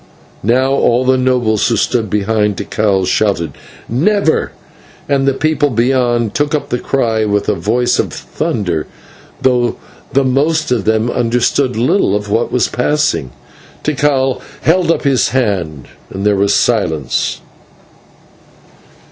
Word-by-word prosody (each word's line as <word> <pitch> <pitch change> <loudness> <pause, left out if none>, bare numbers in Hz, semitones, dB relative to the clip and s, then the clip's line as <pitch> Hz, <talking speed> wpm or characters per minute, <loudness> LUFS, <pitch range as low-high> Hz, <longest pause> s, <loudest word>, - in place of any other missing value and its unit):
Now 130 +5 +2
all 130 -2 +2
the 130 0 +4
nobles 125 -5 +1
who 115 - +1
stood 115 -4 0
behind 105 0 0
Tikal 100 -2 0
shouted 90 -7 0 0.4
"Never!" 165 - +1 0.6
and 140 -1 +1
the 135 - +3
people 150 0 +1
beyond 120 -2 +1
took 145 +1 0
up 150 - -3
the 125 - -1
cry 115 -5 0
with 105 -1 0
a 105 - +2
voice 110 +7 0
of - - 0
thunder, 85 -7 -3 0.6
though 125 -2 +2 0.4
the 140 - +3
most 150 +4 +1
of 115 -6 0
them 110 +2 +1
understood 125 +2 0
little 120 - +2
of 105 0 -3
what 115 +3 0
was 125 - +2
passing. 125 - 0 0.5
Tikal 135 -3 0 0.2
held 175 +3 +2
up 165 - +1
his 135 -4 +2
hand, 95 - -2 0.2
and 95 +2 -5
there 105 -1 +3
was 100 +1 +2
silence. 80 - 0
120 Hz, 135 wpm, -15 LUFS, 105-135 Hz, 0.6 s, the